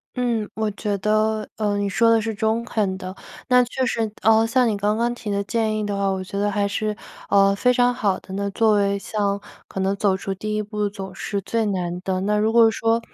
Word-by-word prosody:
嗯， 235 -4 -1
我 215 -1 -1
觉 205 0 -2
得， 215 +1 +1
呃， 210 -2 0
你 205 0 0
说 230 +4 +3
得 230 - +5
是 220 0 -2
中 220 +3 0
肯 205 -5 -1
的。 185 0 -7 0.3
那 250 -1 +5
确 255 +2 -2
实， 225 -3 -1
呃， 225 0 +5
像 250 +1 +3
你 220 - +1
刚 205 +2 0
刚 240 +1 +1
提 240 -3 -7
的 200 0 0
建 220 +1 0
议 215 - -2
的 205 -1 -2
话， 200 0 0
我 190 -1 -2
觉 200 +2 -5
得 205 +1 +1
还 205 0 0
是， 210 +1 -2 0.3
呃， 195 0 +5
非 250 +5 +3
常 245 0 +3
好 205 -6 0
的， 190 - -11
那 200 +1 -2
作 220 +1 +3
为 200 -1 +2
像 200 0 -1 0.3
可 - - -6
能 195 +1 +1
走 195 -1 +1
出 195 0 -4
第 215 +2 -4
一 215 - -1
步 210 0 -2
总 195 -2 -8
是 200 +1 -3
最 225 +4 -1
难 180 -3 -2
的， 185 0 -2
那 210 +2 +1
如 215 +1 +2
果 230 -1 +6
说， 225 +2 +1
210 Hz, 255 characters per minute, -22 LUFS, 200-225 Hz, 0.3 s, 果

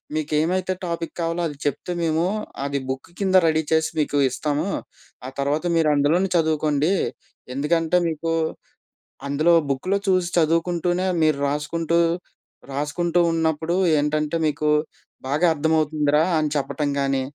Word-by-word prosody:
మీకు 155 0 -3
ఏమైతే 185 +3 0
టాపిక్ 170 -1 -4
కావాలో 170 +1 -1
అది 145 - -8
చెప్తే 145 +5 -2
మేము, 160 +1 +1 0.4
అది 140 0 -1
బుక్ 130 +4 -5
కింద 190 -1 +3
రెడీ 160 0 +2
చేసి 160 0 +2
మీకు 145 -1 0
ఇస్తాము. 150 +6 -2 0.6
ఆ 130 - -5
తర్వాత 145 +4 0
మీరు 160 -2 +3
అందులోనే 165 +7 +2
చదువుకోండి. 155 0 +1 0.6
ఎందుకంటే, 165 +4 +1
మీకు 165 +1 -2 1.0
అందులో 155 +5 +3 0.2
బుక్‌లో 185 +9 0
చూసి 185 -2 +2
చదువుకుంటూనే 175 +3 +1 0.2
మీరు 155 -2 +3
రాసుకుంటూ, 165 +3 0 0.7
రాసుకుంటూ 165 +5 0
ఉన్నప్పుడు 160 +1 0 0.2
ఏంటంటే 150 +2 0
మీకు 150 0 0 0.6
బాగా 150 +6 +1
అర్థమవుతుందిరా! 155 -1 +1 0.2
అని 155 -1 +1
చెప్పటం 145 +1 -1
గానీ, 135 -1 +1
155 Hz, 125 wpm, -23 LUFS, 145-170 Hz, 1.0 s, కింద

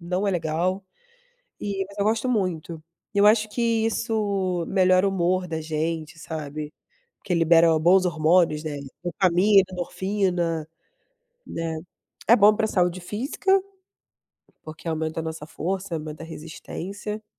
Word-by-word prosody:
não 180 +3 -2
é - - +3
legal 175 +3 -1 0.8
e 195 -1 -2
mas 200 - -15
eu 200 - 0
gosto 225 +3 +1
muito. 170 -7 -2 0.3
E - - -4
eu 200 - +6
acho 215 0 +4
que 240 - -3 0.2
isso 200 -6 -1
melhora 185 0 +4
o - - +2
humor 185 0 +1
da 160 -1 -2
gente, 160 +1 -3
sabe. 155 -2 -6 0.5
Porque 185 - -5
libera 165 0 +5
bons 185 +4 +5
hormônios, 165 -2 +2
né. 150 -2 -4 0.3
Dopamina, 185 +3 +4
endorfina, 180 -3 -1 0.8
né. 165 -1 -3 0.5
É 235 - +8
bom 210 -1 +6
pra 220 - +1
saúde 180 -3 +1
física, 275 - 0 1.0
porque 155 +2 -8
aumenta 160 0 -2
a - - -4
nossa 160 -1 -6
força, 185 +3 -3
aumenta 155 -1 -6
a - - -7
resistência. 195 +6 -7
180 Hz, 140 wpm, -24 LUFS, 160-200 Hz, 1.0 s, É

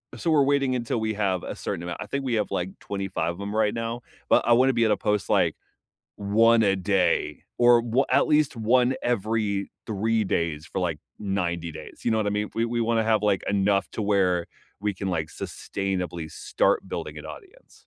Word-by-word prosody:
so, 165 - -1
we're 145 -3 +5
waiting 140 -2 +2
until 120 -1 -1
we 110 0 -1
have 95 -4 0
a - - -5
certain 85 - -4
amount. 85 0 -5
I - - -4
think 140 0 -3
we 125 -3 0
have, 105 -3 0
like, 90 +1 -2
25 95 -4 -3
of 95 - -10
'em 100 +1 -4
right 110 -1 +2
now, 115 +1 -3 0.3
but - - +4
I 120 - +6
wanna 130 +2 +5
be 115 0 +2
able 105 - +3
to - - -14
post, 105 -1 0
like, - - +3 0.6
1 115 +3 +4
a 100 -2 +3
day 95 0 +1 0.2
or 120 -1 +6
wa 120 +4 +1
at 140 +2 +3
least 150 -4 +2
1 125 +3 +3
every 110 -3 -1 0.2
3 110 +1 0
days 80 -4 -1
for, 95 - -4
like, 85 -4 -1 0.2
90 85 -4 -2
days, 80 0 -11
you 120 - +2
know 110 - +2
what 110 -1 0
I - - +1
mean? 105 0 -1
We 115 - +1
we 120 0 -1
wanna 115 -1 +1
have, 110 -2 +2
like, 100 -2 +2
enough 100 -2 +1
to 110 - -3
where 95 -4 +2 0.3
we 105 -1 -1
can, 95 +1 -4
like, 80 -4 -1
sustainably 90 -5 -4
start - - 0
building - - -5
an - - -9
audience. 455 +6 -13
105 Hz, 210 wpm, -25 LUFS, 95-115 Hz, 0.6 s, I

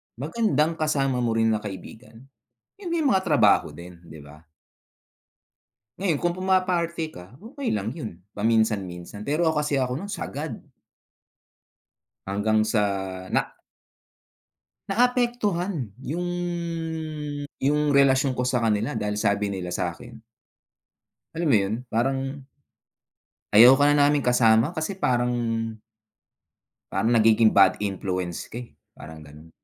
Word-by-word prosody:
Magandang 160 - 0
kasama 135 -5 0
mo 120 -2 0
rin 115 0 +2
na 110 - 0
kaibigan 110 +3 -10 0.6
hindi 340 -2 -2
mga 255 -12 +2
trabaho 135 - +3
din, 85 0 -12
'di 80 -2 -13
ba? 75 +2 -14 1.5
Ngayon 175 -7 -1
kung 175 0 -1
puma-party 180 -3 0
ka, 100 - -13
okey 265 - -5
lang 105 0 -2
yun, 110 - -7 0.2
paminsan-minsan 105 -3 -1
pero 155 +5 0
ako 150 -2 +1
kasi, 145 -2 0
ako 125 -1 -1
nun 200 +7 -6
sagad. 155 -5 -5 1.7
Hanggang 110 +2 +1
sa, 110 -1 +1 0.5
na - - -1 1.4
Naapektuhan 205 - 0 0.2
yung 175 +5 -3 1.3
yung 150 +2 +1
relasyon 135 -2 +3
ko 125 - 0
sa 125 -1 0
kanila 110 +4 0
dahil 105 -2 -2
sabi 100 -1 0
nila 90 -2 -4
sa'kin. 110 +7 -5 1.1
Alam 165 0 -2
mo 120 - +5
yun, 100 +1 -1 0.2
parang 135 +3 -1 1.1
Ayoko 125 +6 +8
na 145 - +5
naming 145 0 +3
kasama 125 +4 +4
kasi, 175 +5 -4
parang 125 -6 +1 1.6
"parang 115 - 0
nagiging 110 -1 +5
bad 95 -2 +5
influence 95 -3 -3
ka, 120 - -6
eh." 120 - -13 0.2
Parang 80 0 -11
gano'n, 75 +3 -15
125 Hz, 115 wpm, -24 LUFS, 105-155 Hz, 1.7 s, Ayoko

